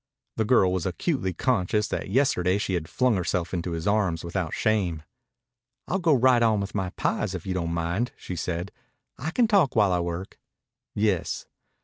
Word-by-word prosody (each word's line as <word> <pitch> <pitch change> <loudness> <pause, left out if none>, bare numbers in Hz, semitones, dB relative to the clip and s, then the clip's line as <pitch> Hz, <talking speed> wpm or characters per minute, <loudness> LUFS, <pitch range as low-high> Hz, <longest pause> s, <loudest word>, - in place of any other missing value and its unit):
The 110 - +1
girl 100 -6 +4
was 95 -1 -1
acutely 95 - -1
conscious 105 +1 0
that - - -3
yesterday 95 -6 +2
she 100 -2 -2
had 80 -3 -2
flung 125 -3 +2
herself 90 0 -1
into 85 -1 -2
his 80 0 -4
arms 100 -6 +1
without 85 -1 -3
shame. 95 -8 0 0.8
"I'll 190 - 0
go 165 -5 +4
right 125 -1 +4
on 110 -2 +3
with 100 - -5
my 95 -3 -1
pies 100 +1 -1
if 90 - -6
you 95 - -2
don't 85 -2 -2
mind," 85 +8 -1
she 90 - -6
said. 85 +3 -3 0.5
"I 150 - -2
can 230 +7 +2
talk 200 - +3
while 105 -4 +4
I 90 - +2
work." 85 +2 -5 0.6
"Yes." 100 -5 0
95 Hz, 180 wpm, -26 LUFS, 90-115 Hz, 0.8 s, girl